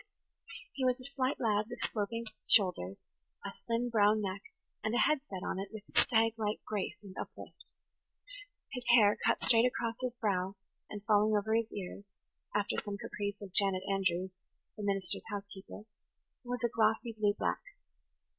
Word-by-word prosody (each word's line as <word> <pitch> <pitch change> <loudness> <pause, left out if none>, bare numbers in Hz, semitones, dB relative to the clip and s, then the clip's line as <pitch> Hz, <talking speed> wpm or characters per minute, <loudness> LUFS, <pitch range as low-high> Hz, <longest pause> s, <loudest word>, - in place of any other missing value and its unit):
He 270 - -3
was 255 0 +2
a - - -11
slight 270 0 -1
lad, 215 -3 +2
with - - -7
sloping 230 +2 -2 0.2
shoulders, 170 - +3 0.4
a - - -3
slim 235 +1 -2
brown 215 -1 +5
neck, 195 -2 -3 0.4
and 220 +2 0
a - - +3
head 305 +3 +4
set 190 -2 -5
on - - -2
it 195 0 -4
with 215 -2 -8
stag 225 -2 +4
like 210 0 -1
grace 210 -1 -2
and 195 -2 -10
uplift. - - -11 1.0
His 250 -2 -4
hair, 210 -3 +6
cut - - +2
straight 230 +1 +6
across 230 -2 -2
his 255 -1 -2
brow 195 -4 0 0.3
and 205 -1 -7
falling 215 -1 +4
over 215 +2 0
his 225 0 +1
ears, 200 +1 -6 0.5
after 205 -1 +1
some 205 -1 -4
caprice 205 0 -4
of 190 -3 -9
Janet 195 -2 +2
Andrews, 185 -1 0 0.4
the 215 - -7
minister's 195 -3 0
housekeeper, 200 0 -7 0.6
was 245 0 -4
a - - +5
glossy 225 +1 +2
blue 210 -2 +1
black. - - 0
210 Hz, 165 wpm, -33 LUFS, 200-230 Hz, 1.0 s, hair